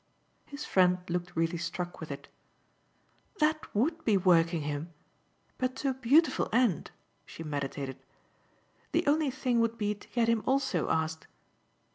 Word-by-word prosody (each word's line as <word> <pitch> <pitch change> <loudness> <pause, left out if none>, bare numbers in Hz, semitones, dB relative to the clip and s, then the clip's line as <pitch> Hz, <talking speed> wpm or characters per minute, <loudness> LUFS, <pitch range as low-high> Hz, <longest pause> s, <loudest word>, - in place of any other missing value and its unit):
His 285 +1 -7
friend 180 -1 +4
looked 175 0 -3
really 165 +1 0
struck 175 +1 -4
with 160 - -7
it. 140 - -7 1.1
"That 310 -1 +1
WOULD 315 +10 +1
be 215 -4 +3
working 170 -3 +3
him. 150 +3 -4 0.7
But 255 0 -1
to 270 0 0
a - - -2
beautiful 265 +4 +3
end!" 230 - +2 0.3
she 165 - -9
meditated. 140 -3 -4 0.9
"The - - +2
only 300 0 +3
thing 250 -2 0
would 230 0 +1
be 210 -2 0
to 205 - -16
get 235 -2 +1
him 230 -1 +2
also 265 - +1
asked." 160 0 -1
200 Hz, 145 wpm, -30 LUFS, 165-260 Hz, 1.1 s, friend